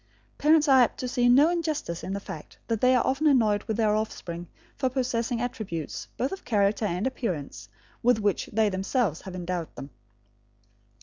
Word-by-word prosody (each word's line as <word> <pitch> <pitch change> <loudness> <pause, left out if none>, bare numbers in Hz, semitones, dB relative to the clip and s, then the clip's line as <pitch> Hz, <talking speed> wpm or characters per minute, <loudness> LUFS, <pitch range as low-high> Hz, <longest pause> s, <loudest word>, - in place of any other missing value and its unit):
Parents 305 0 +4
are 265 -2 +7
apt 240 - +1
to 255 - -2
see 245 0 +2
no 285 +7 +6
injustice 305 - -2
in 190 - -4
the 200 - -2
fact 160 -6 -9
that 225 -2 -1
they 255 0 +5
are 250 - +2
often 275 +4 +1
annoyed 220 -7 +3
with 220 - -2
their 215 -2 +2
offspring 175 -5 -4 0.3
for 260 -2 0
possessing 245 -2 -1
attributes, 210 -10 -4
both 260 - -1
of 385 - -6
character 210 -1 +1
and 180 0 -1
appearance, 150 - -4 0.3
with 245 -1 +4
which 205 -3 0
they 220 0 +2
themselves 195 - -1
have 190 -1 -8
endowed 175 -2 -4
them. 140 - -8
225 Hz, 180 wpm, -27 LUFS, 190-255 Hz, 0.3 s, are